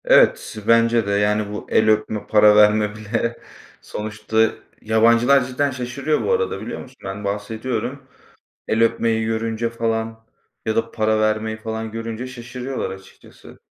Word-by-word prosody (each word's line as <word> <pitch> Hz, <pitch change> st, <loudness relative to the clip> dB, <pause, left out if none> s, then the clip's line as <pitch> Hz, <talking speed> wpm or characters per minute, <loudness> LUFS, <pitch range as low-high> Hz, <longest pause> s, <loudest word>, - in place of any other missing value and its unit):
Evet, -, -, +4 dB
bence 115 Hz, -1 st, +4 dB
de. -, -, 0 dB
Yani, 105 Hz, +1 st, +1 dB
bu 105 Hz, -, -7 dB
el 110 Hz, 0 st, +3 dB
öpme, 110 Hz, 0 st, 0 dB
para 105 Hz, -1 st, +6 dB
verme 105 Hz, 0 st, +4 dB
bile 115 Hz, +2 st, -2 dB, 0.4 s
sonuçta 110 Hz, +1 st, -1 dB, 0.3 s
Yabancılar 115 Hz, +4 st, +4 dB
cidden 135 Hz, +3 st, -1 dB
şaşırıyor 130 Hz, +4 st, -2 dB
bu -, -, 0 dB
arada 465 Hz, 0 st, 0 dB
biliyor -, -, -6 dB
musun? 130 Hz, 0 st, -14 dB
Ben 95 Hz, +2 st, -6 dB
bahsediyorum. 110 Hz, +6 st, -4 dB, 0.6 s
El 110 Hz, +1 st, +2 dB
öpmeyi 115 Hz, -1 st, +1 dB
görünce 115 Hz, +1 st, -2 dB
falan 115 Hz, -1 st, -3 dB, 0.4 s
ya 110 Hz, -, 0 dB
da 115 Hz, 0 st, 0 dB
para 110 Hz, -1 st, +1 dB
vermeyi 110 Hz, 0 st, 0 dB
falan 110 Hz, 0 st, -5 dB
görünce 115 Hz, +2 st, -5 dB
şaşırıyorlar 125 Hz, +1 st, -5 dB
açıkçası. 95 Hz, 0 st, -14 dB
110 Hz, 140 wpm, -21 LUFS, 110-120 Hz, 0.6 s, para